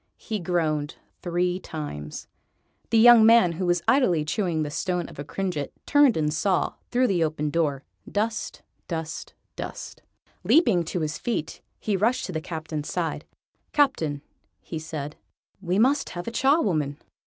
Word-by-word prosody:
He 220 -2 -4
groaned 160 -4 -1 0.3
three 180 +1 0
times. 110 - -7 0.6
The 230 - +3
young 235 0 +8
man, 225 -5 +6
who 180 +2 -3
was 175 -1 +1
idly 180 - +3
chewing 165 -2 0
the 150 - -4
stone 180 +2 -2
of - - -12
a - - -3
cringet, 155 -1 -3
turned 290 - +5
and 150 -1 0
saw, 185 +3 +1 0.2
through 250 +1 +2
the 185 -8 +2
open 150 -1 -1
door, 145 -4 0 0.3
dust, 215 +2 -2 0.2
dust, 160 -2 -5 0.2
dust. - - -7 0.4
Leaping 230 - +4
to 175 +1 -3
his 150 -1 -3
feet, 165 -10 -3 0.2
he 210 - -1
rushed 235 +7 +1
to - - -5
the 160 -2 -3
Captain's 155 -2 -5
side. - - -2 0.5
"Captain," 160 - +1 0.5
said 155 -2 -5 0.5
he, 185 - -13
"we 180 +2 +2
must 270 +6 +3
have 175 +3 -6
a - - -2
Charwoman." 195 - +2
175 Hz, 155 wpm, -25 LUFS, 155-220 Hz, 0.6 s, young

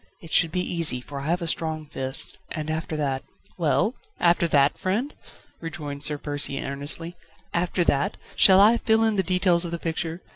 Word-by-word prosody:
It 165 - -13
should 165 -2 +4
be 180 - -1
easy, 165 -8 +1
for 140 +3 -8
I 140 - -6
have 175 +2 0
a - - -3
strong 160 -1 -1
fist, 135 -2 0
and 155 -1 -4
after 160 0 -3
that 135 -3 -1 0.2
..." 200 - -32
"Well? 180 - +1 0.3
After 170 0 +3
that, 140 -2 +3
friend?" 220 +10 -1 0.5
rejoined 150 -4 -6
Sir 150 +1 0
Percy 145 -1 -1
earnestly, 145 +5 -2 0.4
"after 175 +1 0
that? 140 -4 0 0.2
Shall 190 0 +7
I 215 +4 +6
fill 225 -1 +2
in 220 -1 +2
the 195 - +2
details 180 -2 +2
of 170 - -3
the 170 - -3
picture? 165 +1 -4
165 Hz, 190 wpm, -24 LUFS, 145-180 Hz, 0.5 s, Shall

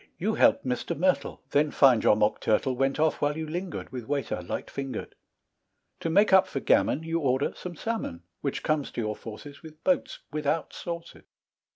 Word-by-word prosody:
You - - 0
help - - +4
Mr. 125 +1 -2
Myrtle, 185 +3 0
Then 150 +1 +3
find 130 -6 +5
your - - +6
mock 105 0 +1
turtle 120 +4 +2
Went 135 +3 0
off 155 0 +2
while 145 +1 +1
you 160 - -3
lingered, 175 +4 -5
With 125 -3 -6
waiter 140 -1 -2
light - - -4
fingered. 135 -4 -5 0.9
To 165 - -2
make 200 +4 +4
up 190 0 +7
for 140 - -3
gammon, 150 +3 +2
You 165 +1 -1
order 135 -2 +1
some 180 -1 -7
salmon, 210 - -4 0.2
Which 140 - -2
comes 155 -2 0
to - - -2
your 105 -1 -2
fauces, 140 +6 -10
With 155 -1 -13
boats 275 -1 +1
without 150 +1 -1
sauces. 170 -1 -7
145 Hz, 185 wpm, -27 LUFS, 130-165 Hz, 0.9 s, up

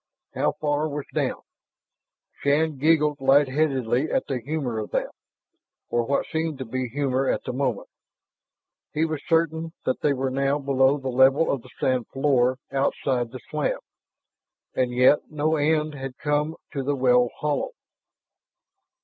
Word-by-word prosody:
How - - +1
far 150 +1 -1
was 145 -1 -4
down? - - -1 1.0
Shann 150 0 +1
giggled 150 -1 +3
lightheadedly 135 -1 +2
at 265 - +1
the 135 -4 -2
humor 130 -4 -2
of 105 - -5
that, - - -1 0.8
or 120 - +2
what 140 - +1
seemed 160 -2 -2
to 130 - -5
be 130 +2 -3
humor 135 0 0
at - - 0
the 125 - -4
moment. 125 -5 -1 1.1
He 155 +2 +1
was 155 -3 -3
certain 165 0 +1
that 130 - -1
they 145 - +3
were 130 -1 -2
now 135 +2 +1
below 135 0 +2
the 135 -2 -4
level 130 +5 +4
of 135 - -2
the 130 - -16
sand 130 -2 +1
floor 130 -2 +2
outside 135 -3 0
the 125 +1 -9
slab. 150 -1 0 1.0
And 125 -1 0
yet 125 +4 +4
no 155 +1 0
end 155 0 +1
had 135 -2 -7
come 150 +2 0 0.2
to 140 - -2
the 140 +2 0
well 125 -2 +4
hollow. 150 - -1
140 Hz, 150 wpm, -25 LUFS, 130-150 Hz, 1.1 s, level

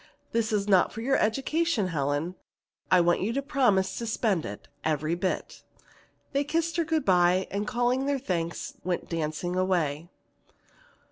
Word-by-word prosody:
This 225 -1 0
is 210 -1 0
not 190 -3 +4
for 225 - -6
your 270 +3 +2
education, 270 - +1
Helen. 145 +2 -1 0.6
I 185 - +6
want 175 0 +2
you 205 +5 0
to 275 - 0
promise 245 -10 +2
to 235 - -4
spend 215 -6 0
it, 100 - -9 0.2
every 155 +1 0
bit." 180 +2 -3 0.7
They 280 +1 +2
kissed 330 +3 -1
her 335 - +3
good 320 -1 0
by 180 0 +4
and 205 +1 -2
calling 245 +2 +1
their 285 -1 +1
thanks 170 -9 -3
went 180 -1 -2
dancing 165 +2 -2
away. 170 -4 0
190 Hz, 155 wpm, -27 LUFS, 175-255 Hz, 0.7 s, I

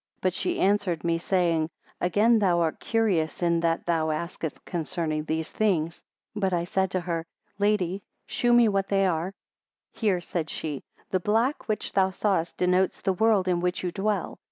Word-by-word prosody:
But 185 -1 0
she - - -1
answered 190 -4 +1
me 170 -1 +1
saying; 170 -3 +1 0.3
Again 215 +6 +3
thou 180 -4 +3
art 160 -2 0
curious 190 -8 0
in 170 -1 +3
that 165 0 0
thou 165 -2 +1
asketh 160 0 -4
concerning 155 -2 -2
these 160 0 -2
things. 170 -6 0 0.3
But 195 -3 0
I 170 -1 +1
said 190 +2 0
to 185 -1 -1
her, 170 -1 -2 0.4
Lady, 200 -2 +1 0.2
chew 240 - 0
me 240 -1 +6
what 195 -2 +1
they 195 -1 +2
are? 180 +2 -1 0.6
24 - - -20
Hear, 195 -5 +2
said 165 -3 -3
she; 150 -4 -4 0.3
The 185 - +2
black 225 - 0
which 215 -2 -2
thou 190 -1 +3
sawest 185 -3 -1
denotes 180 +1 +1
the 190 - +2
world 205 -1 +3
in 180 -1 +2
which 180 +1 -1
you 180 - -1
dwell. 200 -1 -2
180 Hz, 180 wpm, -26 LUFS, 165-200 Hz, 0.6 s, me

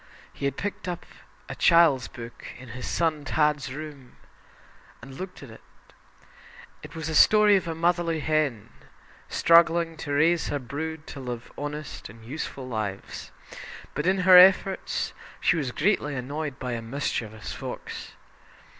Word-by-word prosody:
He - - -5
had 140 -1 -1
picked 200 -1 -4
up 175 -1 -4 0.4
a - - -5
child's 160 -7 +4
book 120 0 -10
in 130 -1 -12
his 125 +2 -6
son 160 -3 0
"Tad's" 150 -3 +1
room 145 -3 -9 0.8
and 135 - -11
looked 185 +2 -8
at 130 - -11
it. 110 - -14 1.2
It - - -11
was 160 -1 -4
a 160 - -3
story 210 +5 +6
of 190 -3 0
a 165 - -3
motherly 170 -1 +1
hen, 150 -8 0 0.6
struggling 170 0 +4
to 150 -2 -6
raise 165 +3 +3
her 145 - -1
brood 150 +4 -5
to 140 - -8
lead 120 -3 -5
honest 145 -3 -6
and 110 +2 -14
useful 135 0 -6
lives; 105 -5 -5 0.6
but 150 +4 -2
in 190 +1 +2
her 185 -1 +10
efforts 190 +1 +4 0.3
she - - +3
was 140 -6 -2
greatly 150 - +1
annoyed 140 +2 -4
by 125 -2 -4
a 120 -1 -3
mischievous 115 -3 -4
fox. - - -7
150 Hz, 150 wpm, -26 LUFS, 130-170 Hz, 1.2 s, her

